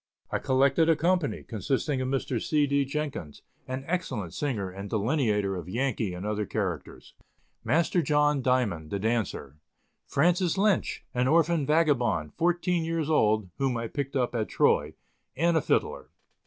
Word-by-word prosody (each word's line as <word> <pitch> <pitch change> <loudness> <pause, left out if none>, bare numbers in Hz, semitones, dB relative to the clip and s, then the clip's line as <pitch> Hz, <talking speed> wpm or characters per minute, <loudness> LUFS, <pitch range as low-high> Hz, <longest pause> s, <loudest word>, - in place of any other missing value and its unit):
I - - 0
collected 135 +5 +3
a 165 - +5
company, 175 -1 0
consisting 130 +4 -2
of 130 - -1
Mr. 130 -3 -1
C. 150 -2 +2
D. 140 0 +1
Jenkins, 140 - -5 0.2
an 130 +1 -4
excellent 130 - -3
singer 120 -8 -2
and 100 +2 -7
delineator 110 -4 0
of 90 -1 -6
Yankee 115 -4 -1
and 90 +3 -6
other 105 -1 -2
characters; 95 -9 -4 0.5
Master 160 +8 +2
John 150 -2 +2
Diamond, 120 -12 0
the 100 - -2
dancer; 105 - -2 0.5
Francis 175 +4 +2
Lynch, 200 -2 +1
an 125 0 +1
orphan 165 -1 +3
vagabond, 125 - +2
fourteen 175 0 +1
years 160 -1 -1
old, 110 - +2
whom 135 -3 0
I 115 0 -3
picked 140 +2 -4
up 125 -2 0
at 110 -3 -2
Troy, - - +2 0.4
and 170 +3 +2
a 160 - +3
fiddler. - - -1
135 Hz, 155 wpm, -27 LUFS, 105-155 Hz, 0.5 s, a